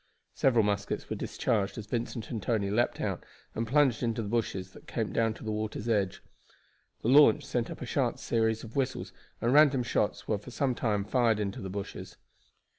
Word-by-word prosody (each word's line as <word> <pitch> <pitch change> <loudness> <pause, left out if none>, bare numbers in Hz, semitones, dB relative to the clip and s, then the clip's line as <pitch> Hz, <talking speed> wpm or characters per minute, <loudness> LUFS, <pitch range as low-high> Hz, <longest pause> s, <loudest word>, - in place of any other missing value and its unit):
Several 120 -4 +3
muskets 100 -1 -1
were - - 0
discharged 100 -4 -1
as 110 - -5
Vincent 115 0 -4
and 115 -3 -3
Tony 100 -2 0
leaped 120 +3 +1
out - - -2 0.3
and 115 +1 -2
plunged 135 -2 +3
into 115 -2 -1
the - - -5
bushes 100 -5 -2
that - - -16
came 110 -3 -2
down 115 -1 +1
to - - -12
the 110 - -3
water's 110 +1 -3
edge. 100 -5 0 0.8
The - - -1
launch 135 -3 +6
sent - - -1
up - - -8
a - - -4
sharp - - 0
series 110 -1 0
of 115 -1 -10
whistles, 135 -2 -2 0.3
and 120 +2 +2
random 145 -4 +6
shots 105 -3 -1
were 105 - 0
for 105 - -11
some 130 +1 0
time 105 -4 0
fired 115 -3 +2
into 100 -2 -3
the 95 - -5
bushes. 100 +1 -6
110 Hz, 195 wpm, -30 LUFS, 105-120 Hz, 0.8 s, launch